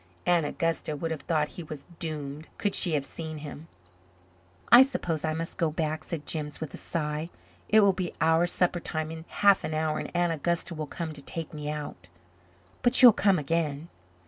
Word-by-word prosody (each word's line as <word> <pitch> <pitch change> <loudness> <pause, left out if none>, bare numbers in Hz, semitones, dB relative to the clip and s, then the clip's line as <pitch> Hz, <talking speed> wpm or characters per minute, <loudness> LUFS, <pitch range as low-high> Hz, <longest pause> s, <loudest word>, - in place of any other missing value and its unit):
Aunt 170 -4 +3
Augusta 165 0 -2
would 165 +3 -3
have 160 - -3
thought 155 -3 0
he - - -8
was 150 -3 -9
doomed, 150 -1 -5
could 205 -2 -1
she 175 - +2
have 145 -2 0
seen 155 +1 -7
him. 150 +1 -9 1.0
"I 240 +2 +11
suppose 175 - 0
I 155 -1 0
must 165 +1 -5
go 165 - +1
back," 155 0 -2
said 160 -3 -5
Jims 150 -2 -2
with 160 -3 -6
a - - -7
sigh. 155 0 -3 0.4
"It 215 0 +6
will 200 -1 +5
be 185 -2 -3
our 165 +2 +3
supper 175 0 +1
time 160 -1 -4
in 160 0 -8
half 200 -1 +4
an 155 - -3
hour 155 0 0
and - - -5
Aunt 175 -1 +2
Augusta 170 +3 -2
will 155 -2 -5
come 160 +1 -5
to 145 - -8
take 165 +3 -5
me 150 -1 -5
out." 150 -11 -6 0.7
"But 250 +2 +5
you'll 245 -3 +11
come 195 -2 +3
again?" 155 +1 -1
160 Hz, 200 wpm, -28 LUFS, 150-170 Hz, 1.0 s, I